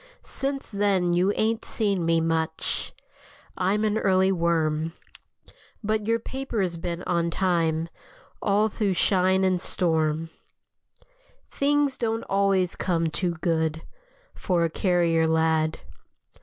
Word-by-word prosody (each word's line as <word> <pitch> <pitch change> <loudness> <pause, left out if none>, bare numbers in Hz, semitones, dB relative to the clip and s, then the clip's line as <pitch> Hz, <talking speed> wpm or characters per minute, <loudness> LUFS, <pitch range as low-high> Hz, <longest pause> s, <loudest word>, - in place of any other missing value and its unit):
Since 275 -2 -3
then 195 -4 +1
you 180 +3 +3
ain't 225 +1 0
seen 200 -5 0
me 165 0 +2
much; 160 -1 -1 0.6
I'm 195 +4 0
an 215 0 +1
early 190 -1 +3
worm. 165 -2 0 0.9
But 215 0 -1
your 230 0 +3
paper's 230 -7 -3
been 170 +1 -4
on 170 -1 0
time 165 -3 0 0.5
All 205 +2 +2
through 205 -3 -1
shine 190 +1 +2
and 185 -2 +1
storm. 160 -3 0 1.2
Things 285 -1 +1
don't 225 -1 -1
always 195 -2 +1
come 165 -3 0
too 175 +1 -1
good 160 -2 0 0.5
For 175 -3 0
a 165 - 0
carrier 170 -3 +2
lad. 160 0 +1
180 Hz, 115 wpm, -25 LUFS, 165-205 Hz, 1.2 s, you